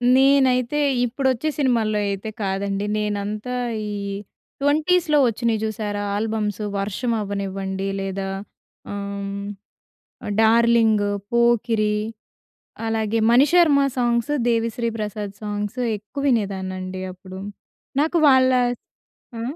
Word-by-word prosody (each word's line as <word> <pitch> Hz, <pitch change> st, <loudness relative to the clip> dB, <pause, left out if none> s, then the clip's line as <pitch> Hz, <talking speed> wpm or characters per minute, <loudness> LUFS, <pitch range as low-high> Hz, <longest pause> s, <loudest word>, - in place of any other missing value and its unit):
నేనైతే 265 Hz, 0 st, +4 dB, 0.3 s
ఇప్పుడొచ్చే 260 Hz, +3 st, 0 dB
సినిమాల్లో 230 Hz, -6 st, +2 dB
అయితే 200 Hz, +2 st, -3 dB
కాదండి 195 Hz, +1 st, -1 dB
నేనంతా 210 Hz, +3 st, -2 dB, 0.3 s
ఈ -, -, -4 dB, 0.7 s
20స్‌లో 305 Hz, +2 st, +3 dB
వచ్చినయి 230 Hz, -1 st, 0 dB
జూసారా 210 Hz, -1 st, -2 dB, 0.2 s
ఆల్బమ్సు 215 Hz, -1 st, -2 dB
'వర్షం' 210 Hz, +4 st, -1 dB
అవ్వనివ్వండి 195 Hz, -1 st, -3 dB
లేదా 195 Hz, 0 st, -3 dB, 0.6 s
ఆహ్, 200 Hz, 0 st, -4 dB, 0.9 s
'డార్లింగ్', 225 Hz, -2 st, +4 dB, 0.2 s
;పోకిరి; 230 Hz, -3 st, +2 dB, 0.9 s
అలాగే 225 Hz, 0 st, 0 dB
మణిశర్మ 290 Hz, +4 st, +5 dB, 0.2 s
సాంగ్స్ 240 Hz, +3 st, +1 dB, 0.2 s
దేవిశ్రీ 230 Hz, 0 st, 0 dB
ప్రసాద్ 210 Hz, -1 st, -4 dB
సాంగ్స్ 210 Hz, +3 st, -3 dB, 0.2 s
ఎక్కువినేదాన్నండి 195 Hz, -6 st, -2 dB
అప్పుడు. 185 Hz, +1 st, -10 dB, 0.6 s
నాకు 320 Hz, +3 st, +2 dB
వాళ్ళ 260 Hz, -1 st, +5 dB, 0.9 s
ఆ -, -, -4 dB
220 Hz, 85 wpm, -22 LUFS, 200-250 Hz, 0.9 s, మణిశర్మ